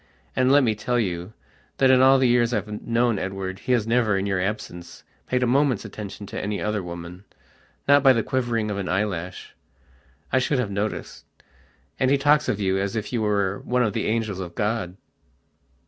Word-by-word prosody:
And, 130 Hz, 0 st, +3 dB
let 145 Hz, 0 st, +6 dB
me 110 Hz, -3 st, +2 dB
tell 120 Hz, +3 st, -1 dB
you, 90 Hz, -1 st, -3 dB, 0.4 s
that 130 Hz, -1 st, +5 dB
in 130 Hz, -1 st, +5 dB
all 135 Hz, +1 st, +7 dB
the 130 Hz, -1 st, +3 dB
years 120 Hz, 0 st, +3 dB
I've 105 Hz, 0 st, -4 dB
known 115 Hz, -2 st, +1 dB
Edward 95 Hz, 0 st, -4 dB
he 130 Hz, -, -3 dB
has 115 Hz, -4 st, +2 dB
never, 115 Hz, -3 st, +2 dB
in 95 Hz, -, -1 dB
your 95 Hz, -2 st, 0 dB
absence, 90 Hz, -3 st, -5 dB, 0.2 s
paid 125 Hz, 0 st, +1 dB
a -, -, +3 dB
moment's 130 Hz, -2 st, +2 dB
attention 105 Hz, -1 st, -8 dB
to -, -, -5 dB
any 105 Hz, 0 st, -3 dB
other 105 Hz, -1 st, -1 dB
womannot 85 Hz, +1 st, -8 dB, 0.8 s
by 135 Hz, -1 st, +7 dB
the 115 Hz, -3 st, +2 dB
quivering 120 Hz, -5 st, -1 dB
of 100 Hz, -, -3 dB
an 95 Hz, -, -3 dB
eyelash. 90 Hz, -2 st, -3 dB, 0.8 s
I 130 Hz, -, +5 dB
should 135 Hz, +2 st, 0 dB
have 120 Hz, -6 st, -1 dB
noticed. 100 Hz, +2 st, -4 dB, 0.7 s
And 130 Hz, -, +2 dB
he 140 Hz, -, +4 dB
talks 145 Hz, +2 st, +3 dB
of 105 Hz, -, -1 dB
you 95 Hz, -1 st, +1 dB
as 100 Hz, +1 st, -2 dB
if 110 Hz, +2 st, -4 dB
you 120 Hz, -, 0 dB
were 100 Hz, -2 st, 0 dB
one 125 Hz, 0 st, +1 dB
of 110 Hz, -4 st, 0 dB
the -, -, -1 dB
angels 110 Hz, -3 st, -1 dB
of 85 Hz, -2 st, -7 dB
God." 105 Hz, -4 st, -2 dB
105 Hz, 195 wpm, -24 LUFS, 95-125 Hz, 0.8 s, all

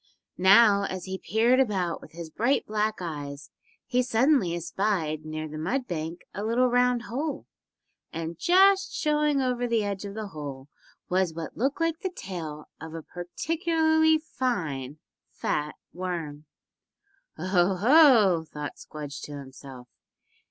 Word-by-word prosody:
Now 200 Hz, +1 st, +6 dB
as 185 Hz, -2 st, -5 dB
he 190 Hz, 0 st, -5 dB
peered 230 Hz, +7 st, +2 dB
about 195 Hz, -9 st, 0 dB
with -, -, -14 dB
his 165 Hz, -1 st, -8 dB
bright 240 Hz, -, +1 dB
black 215 Hz, 0 st, 0 dB
eyes 145 Hz, -4 st, -6 dB, 0.3 s
he 250 Hz, 0 st, +1 dB
suddenly 245 Hz, -, +2 dB
espied 170 Hz, -3 st, -1 dB
near 155 Hz, 0 st, -4 dB
the 155 Hz, 0 st, -7 dB
mud 245 Hz, -, -1 dB
bank 165 Hz, 0 st, -4 dB
a 205 Hz, -, -4 dB
little 230 Hz, +3 st, +2 dB
round 245 Hz, -1 st, +3 dB
hole, 280 Hz, +6 st, -4 dB, 0.7 s
and 165 Hz, 0 st, -5 dB
just 385 Hz, -, +4 dB
showing 300 Hz, -2 st, +1 dB
over 250 Hz, -1 st, 0 dB
the 230 Hz, -2 st, +1 dB
edge 200 Hz, -1 st, -3 dB
of 200 Hz, 0 st, -7 dB
the 215 Hz, -2 st, -5 dB
hole 145 Hz, -4 st, -8 dB, 0.4 s
was 180 Hz, -3 st, 0 dB
what 165 Hz, -1 st, -6 dB
looked 270 Hz, +7 st, -1 dB
like 330 Hz, 0 st, 0 dB
the 375 Hz, -, -2 dB
tail 165 Hz, -, -7 dB
of 160 Hz, 0 st, -8 dB
a 165 Hz, -, -6 dB
particularly 315 Hz, -, +1 dB
fine, 165 Hz, -, -3 dB, 0.3 s
fat 150 Hz, 0 st, -2 dB, 0.2 s
worm. 165 Hz, -5 st, -5 dB, 0.9 s
"Oh, 185 Hz, +2 st, +2 dB
ho!" 225 Hz, -, +6 dB
thought 150 Hz, -2 st, -7 dB
Squdge 145 Hz, -2 st, -8 dB
to 145 Hz, -1 st, -7 dB
himself. 135 Hz, -2 st, -11 dB
190 Hz, 140 wpm, -27 LUFS, 160-250 Hz, 0.9 s, Now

